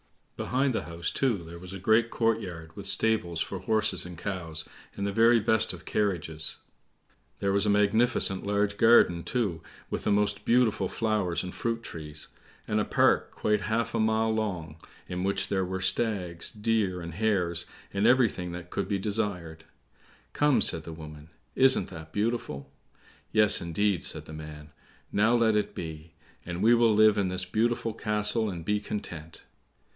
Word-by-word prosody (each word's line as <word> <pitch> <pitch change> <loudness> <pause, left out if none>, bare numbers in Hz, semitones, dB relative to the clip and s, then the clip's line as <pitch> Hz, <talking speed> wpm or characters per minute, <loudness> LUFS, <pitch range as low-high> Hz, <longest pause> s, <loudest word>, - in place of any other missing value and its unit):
Behind 130 +1 0
the - - -2
house, 85 0 -4
too, 115 -10 0
there 85 +1 -10
was 90 +1 -10
a - - -5
great 110 +5 +3
court 115 -1 +1
yard, 80 -4 -9
with 100 -1 -7
stables 100 -7 +1
for 95 - -3
horses 110 +3 +1
and 90 -1 -9
cows, 85 -5 -4 0.3
and 100 - -3
the 100 - -1
very 115 +2 +5
best 110 0 +2
of - - -11
carriages; 80 -6 -2 0.8
there 100 0 0
was 100 +1 +2
a - - +3
magnificent 105 -1 +3
large 100 0 0
garden, 115 -7 +5
too, 100 -10 -2 0.3
with - - -3
the - - +1
most 105 0 +1
beautiful 115 -6 +2
flowers 105 -6 -1
and 90 - -6
fruit 115 0 -3
trees, 75 -4 -7 0.4
and - - 0
a - - +2
park - - +2
quite 105 -1 0
half 115 +2 -1
a 115 - 0
mile 110 0 +2
long, 90 -8 -3 0.3
in 90 0 -4
which 100 +1 0
were 95 -1 -1
stags, 95 -3 +1
deer, 105 -4 -1
and 85 -1 -7
hares, 90 -4 0 0.3
and 100 +3 +2
everything 115 -8 +2
that 85 0 -8
could 100 - -2
be 100 - 0
desired. 95 -6 -3 0.7
"Come," 145 -3 +3
said 80 - +2
the 80 - -8
woman, 75 -1 -11 0.2
"isn't 135 0 +5
that 80 -3 -10
beautiful?" 100 - -3 0.6
"Yes, 105 -1 +6
indeed," 90 +2 0
said - - -2
the 80 - -10
man, 75 -1 -9 0.4
"now 110 +4 +3
let 115 -2 +3
it 105 - -1
be; 80 -1 -8 0.3
and 90 +2 -4
we 115 +2 +6
will 115 -2 +4
live 110 -1 +5
in 100 - +1
this 90 0 -1
beautiful 115 +3 0
castle 105 +1 0
and 85 -4 -6
be 105 +2 +1
content." 85 -6 -7
100 Hz, 170 wpm, -28 LUFS, 85-110 Hz, 0.8 s, Yes